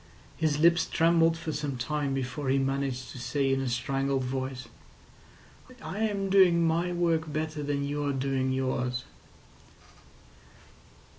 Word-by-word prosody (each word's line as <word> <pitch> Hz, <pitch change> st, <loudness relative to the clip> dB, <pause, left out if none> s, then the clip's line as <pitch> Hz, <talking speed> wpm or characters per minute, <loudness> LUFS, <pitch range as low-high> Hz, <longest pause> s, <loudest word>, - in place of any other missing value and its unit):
His 155 Hz, -2 st, 0 dB
lips 170 Hz, +2 st, +4 dB
trembled 165 Hz, 0 st, +3 dB
for 165 Hz, -1 st, -4 dB
some 145 Hz, -3 st, -3 dB
time 140 Hz, +2 st, -2 dB
before 130 Hz, +1 st, -3 dB
he 135 Hz, -, +3 dB
managed 135 Hz, -1 st, -2 dB
to 130 Hz, -, -9 dB
say 135 Hz, +3 st, 0 dB
in 135 Hz, -, 0 dB
a 135 Hz, -, -1 dB
strangled 135 Hz, +2 st, -1 dB
voice: 130 Hz, 0 st, -4 dB, 1.1 s
"I 205 Hz, -, -6 dB
am 200 Hz, -3 st, -1 dB
doing 180 Hz, -4 st, +5 dB
my 170 Hz, +2 st, +1 dB
work 165 Hz, -3 st, 0 dB
better 155 Hz, 0 st, -3 dB
than 145 Hz, -1 st, -1 dB
you're 145 Hz, 0 st, -1 dB
doing 135 Hz, -1 st, -1 dB
yours." 130 Hz, -1 st, -1 dB
140 Hz, 135 wpm, -28 LUFS, 130-165 Hz, 1.1 s, doing